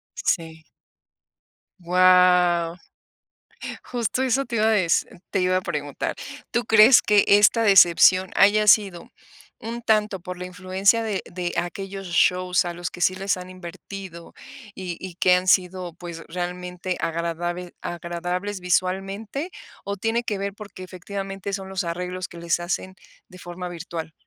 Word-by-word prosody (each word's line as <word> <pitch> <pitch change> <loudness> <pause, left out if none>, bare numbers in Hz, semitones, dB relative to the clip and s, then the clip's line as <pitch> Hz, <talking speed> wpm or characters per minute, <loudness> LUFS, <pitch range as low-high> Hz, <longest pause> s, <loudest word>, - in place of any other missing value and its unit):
Sí. 160 -2 -2 1.1
Guau, 180 -1 +4 1.1
justo 245 +1 -2
eso 265 +1 +1
te 235 - -6
iba 215 +1 +2
a - - +4
deci 185 -6 +2 0.3
te 195 - 0
iba 185 0 +2
a - - +1
preguntar. 150 -6 -4 0.4
¿Tú 240 0 0
crees 220 +3 +7
que 210 -1 +4
esta 210 +3 +5
decepción 185 -1 +6
haya 210 +1 +4
sido 195 -6 +3 0.5
un 235 +1 -6
tanto 210 -4 +1
por 180 0 -7
la 180 - -6
influencia 190 +4 +1
de 215 -3 -2
de 175 -1 -5
aquellos 195 +2 -4
shows 180 +1 +2
a 175 - -3
los 175 -1 -5
que 180 - -10
sí 185 +1 +2
les 195 0 -1
han 180 0 -9
invertido, 185 0 -10 0.4
y 180 -3 -5
y 185 -2 -8
que 180 -1 +4
han 180 +1 0
sido, 180 -2 +1
pues, 170 -1 -9
realmente 180 +1 -4
agradabe 170 +2 -3
agradables 175 +3 -4
visualmente? 195 - -2 0.3
¿O 200 0 -4
tiene 225 +4 -1
que 210 -4 -3
ver 200 0 -4
porque 205 -3 -10
efectivamente 195 +1 -6
son 195 -1 -4
los 190 -1 -2
arreglos 180 +2 -4
que 175 - -13
les 170 0 -1
hacen 185 +2 -3 0.3
de 185 - -14
forma 175 +1 -7
virtual? 165 -2 -7
185 Hz, 150 wpm, -23 LUFS, 175-200 Hz, 1.1 s, crees